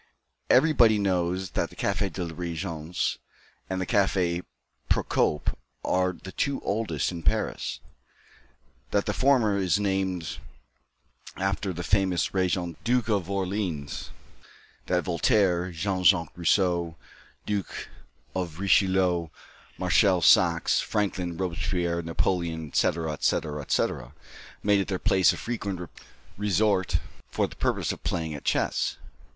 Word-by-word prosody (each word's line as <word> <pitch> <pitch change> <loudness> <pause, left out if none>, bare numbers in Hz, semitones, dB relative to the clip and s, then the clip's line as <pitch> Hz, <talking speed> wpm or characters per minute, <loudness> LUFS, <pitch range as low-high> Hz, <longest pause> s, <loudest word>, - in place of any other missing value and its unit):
Everybody 125 -6 +5
knows 95 -2 0
that - - -1
the - - -15
Café 100 - -1
de 90 - -4
la 85 - -6
Régence 85 -1 -3 0.5
and 95 0 -2
the 95 - -1
Café 95 -4 +1 0.5
Procope 75 - +1 0.3
are 90 0 +2
the 95 +2 -10
two 140 +6 -1
oldest 100 -9 -1
in 85 -2 -6
Paris; 75 - -1 1.1
that 100 +4 +1
the 105 - -1
former 120 -6 +3
is 90 -3 +2
so 105 - 0
named 95 -3 -1 1.0
after 95 0 -1
the 90 0 -5
famous 95 -2 +1
Regent 90 -3 -1
Duke 120 -1 +1
of 100 -5 0
Orleans; 95 -6 -3 0.8
that 90 0 +1
Voltaire, 90 -1 +2
Jean 95 +2 -2
Jacques 85 -3 +4
Rousseau, 85 -1 +1 0.5
Duke 100 -2 -3 0.5
of 90 -3 -3
Richelieu, 95 -3 +3 0.5
Marshall 95 -3 +3
Saxe, - - +5
Franklin, 90 -5 -1
Robespierre, 90 -1 -1
Napoleon, 85 -1 -1
etc., 80 +3 +1
etc., 75 0 -1
etc., 60 -2 -1 0.5
made 100 -1 +4
it 95 - -1
their 95 - -1
place 95 0 +4
of - - -5
frequent 100 -7 -4 0.5
resort 105 -1 +2 0.3
for - - 0
the - - -13
purpose - - 0
of - - -7
playing 80 -2 -2
at 70 - -7
chess. - - 0
95 Hz, 125 wpm, -27 LUFS, 85-100 Hz, 1.1 s, Everybody